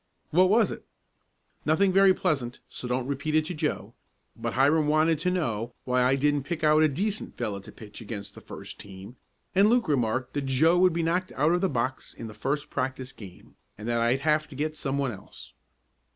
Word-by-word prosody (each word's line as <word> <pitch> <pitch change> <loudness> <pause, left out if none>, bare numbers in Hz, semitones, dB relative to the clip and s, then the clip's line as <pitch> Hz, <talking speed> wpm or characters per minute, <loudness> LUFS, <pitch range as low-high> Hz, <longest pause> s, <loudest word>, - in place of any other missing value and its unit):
"What 185 +3 +5
was 215 -1 +4
it?" - - -7 0.8
"Nothing 185 +5 +3
very 195 0 +6
pleasant, 140 -10 -1
so 125 - -6
don't 125 0 -1
repeat 140 +3 -2
it 155 0 +3
to 180 - -4
Joe, 155 - -3 0.4
but - - -4
Hiram 150 +3 +3
wanted 155 +1 +3
to 180 +3 0
know 120 - -2
why 125 0 +2
I 130 +2 +4
didn't 145 +1 +1
pick 160 +3 -5
out 155 0 +5
a 155 - +6
decent 200 +9 -3
fellow 105 -5 -3
to 100 - -12
pitch 105 +1 -12
against 105 -2 -7
the - - -12
first - - -10
team, 100 +4 -11 0.4
and 200 +3 +5
Luke 240 0 +3
remarked 130 -2 0
that 145 -2 -2
Joe 160 +7 +4
would 185 0 +5
be 170 0 0
knocked 180 +3 0
out 150 +4 +2
of 175 0 +2
the 190 - +2
box 130 0 -3
in - - -8
the 110 - -8
first 140 +7 -3
practice 130 -1 -3
game, 95 -5 -13 0.2
and 105 +2 -7
that 120 0 +1
I'd 120 +3 +2
have 155 +1 +2
to 145 - -12
get 155 +3 -2
some 140 -2 -2
one 140 -3 0
else." 95 -3 -12
140 Hz, 210 wpm, -27 LUFS, 125-165 Hz, 0.8 s, very